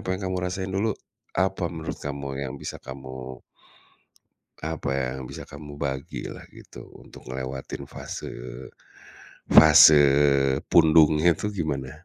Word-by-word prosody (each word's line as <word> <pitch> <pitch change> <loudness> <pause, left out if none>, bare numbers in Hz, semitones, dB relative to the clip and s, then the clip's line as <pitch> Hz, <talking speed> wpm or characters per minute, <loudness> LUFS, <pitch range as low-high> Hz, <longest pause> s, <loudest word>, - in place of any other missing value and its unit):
apa - - -10
yang 100 - -9
kamu 95 - -2
rasain 95 +1 -4
dulu, 105 +4 0 0.5
apa 95 0 0
menurut 80 -1 -6
kamu 70 -1 -5
yang 65 -2 -5
bisa - - -5
kamu 65 -1 -9 1.2
apa 80 -2 -4
ya, 65 -1 -1
yang 65 - -7
bisa - - -10
kamu 75 -1 -11
bagilah, 65 -1 -5
gitu. - - -13 0.2
Untuk - - -15
ngelewatin 65 +2 -6
fase, - - -7 1.2
fase 75 -1 +9 0.7
pundungnya 80 0 +5
itu 105 +6 -4
gimana? 70 -8 -3
75 Hz, 125 wpm, -25 LUFS, 65-85 Hz, 1.2 s, fase